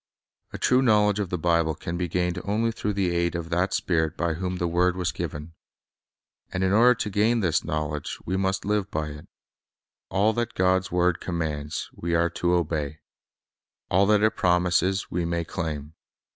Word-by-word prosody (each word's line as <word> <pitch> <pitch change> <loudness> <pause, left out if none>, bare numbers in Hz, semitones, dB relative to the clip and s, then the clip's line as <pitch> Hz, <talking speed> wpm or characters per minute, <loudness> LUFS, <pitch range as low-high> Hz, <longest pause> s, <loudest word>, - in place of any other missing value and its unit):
A - - -6
true 125 +1 +3
knowledge 105 -4 +3
of 100 -4 -2
the 90 - -1
Bible 85 -1 +1
can 85 - -5
be 90 0 -1
gained 90 +1 -1
only 110 +3 0
through 105 -2 -3
the 95 -3 0
aid 85 0 0
of 85 0 -5
that 90 +3 +1
Spirit 80 -3 0
by 85 0 0
whom 90 +2 -3
the 90 -1 -1
word 90 +1 +2
was 90 -1 -1
given. 80 -1 -6 1.0
And 90 - -1
in 95 - +2
order 120 +4 +6
to 110 -3 -3
gain 110 +4 +2
this 85 -5 +1
knowledge 75 -1 -3
we 95 - -1
must 95 0 -1
live 105 -1 0
by 75 -3 -2
it. 75 0 -10 0.8
All 105 +3 +2
that 120 +1 -2
God's 95 0 +2
word 90 -1 +2
commands, 80 -4 -3
Ave 85 0 -2
are 85 +1 +3
to 85 +1 +1
obey. 80 -3 -1 0.9
All 95 +2 +4
that 105 0 +4
it 110 - +3
promises, 90 +2 +1
we 90 0 -1
may 85 0 -1
claim. 80 -3 -4
90 Hz, 185 wpm, -25 LUFS, 85-95 Hz, 1.0 s, order